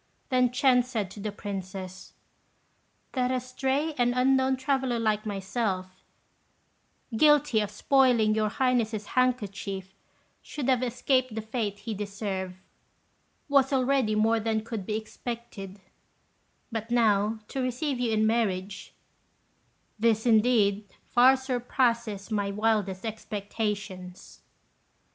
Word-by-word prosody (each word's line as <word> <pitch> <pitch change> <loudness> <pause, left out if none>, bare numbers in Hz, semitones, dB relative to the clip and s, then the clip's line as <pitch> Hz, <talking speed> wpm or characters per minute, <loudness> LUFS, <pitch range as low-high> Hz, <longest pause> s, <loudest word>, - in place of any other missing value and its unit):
Then 255 -2 +3
Ch'ên 250 0 +4
said 225 -7 -3
to 210 - -10
the 210 +1 -3
Princess, 190 -2 -7 1.0
"That 250 -2 0
a 255 - +1
stray 265 +5 -1
and 245 0 +2
unknown 265 +1 +3
traveller 260 -2 0
like 215 -1 0
myself, 195 -2 -3 1.1
guilty 295 -3 +4
of 210 -1 -1
spoiling 235 -1 +3
your 215 0 +1
Highness's 230 -3 0
handkerchief, 200 -6 -1 0.5
should 275 -3 -4
have 255 -2 +3
escaped 255 0 0
the 220 - -2
fate 220 -3 -3
he 210 +2 -5
deserved, 200 -2 -4 0.9
was 275 -2 +3
already 260 -4 +2
more 225 +1 +3
than 220 0 -1
could 220 -4 -6
be 215 - 0
expected; 220 -3 -7 0.9
but 225 0 -4
now 220 -2 +2
to 270 - -3
receive 255 +2 -2
you 240 -2 0
in 215 0 +2
marriage 200 -4 -1 1.0
this, 225 0 +2
indeed, 215 -3 +3 0.2
far 255 +3 +5
surpasses 240 -5 -1
my 205 -2 0
wildest 205 -2 0
expectations." 205 -3 -5
225 Hz, 115 wpm, -27 LUFS, 205-255 Hz, 1.1 s, far